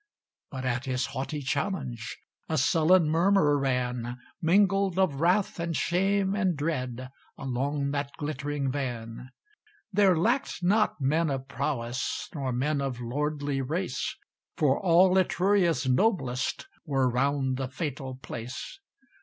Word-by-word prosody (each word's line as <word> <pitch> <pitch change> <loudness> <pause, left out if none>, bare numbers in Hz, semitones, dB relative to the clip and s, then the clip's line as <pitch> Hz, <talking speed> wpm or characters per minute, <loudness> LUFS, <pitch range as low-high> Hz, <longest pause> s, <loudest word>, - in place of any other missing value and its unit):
But 130 -1 -6
at 125 0 -1
his 130 -1 0
haughty 140 +2 -3
challenge 140 - -3 0.3
A 160 - 0
sullen 160 +5 +4
murmur 165 -1 +3
ran, 125 -2 -1 0.2
Mingled 195 +2 +3
of 165 -7 +1
wrath 180 +2 +2
and 170 -2 -1
shame 195 +2 +1
and 190 -6 +1
dread, 130 -4 -3 0.3
Along 140 +2 -1
that 145 -1 -2
glittering 145 -1 -2
van. 125 -3 -5 0.6
There 190 -3 +4
lacked 235 +2 0
not 210 0 +2
men 155 +4 +1
of 135 -1 -3
prowess, 120 -3 -3
Nor 135 -4 -2
men 140 +4 0
of 135 -3 -3
lordly 145 +3 -2
race; 150 0 -2 0.4
For 140 -3 +3
all 185 +1 +5
Etruria's 180 -4 +2
noblest 130 - +1 0.2
Were 135 -4 +1
round 130 +1 +1
the 135 -1 -2
fatal 135 -1 -4
place. 120 - -7
145 Hz, 125 wpm, -28 LUFS, 130-175 Hz, 0.6 s, all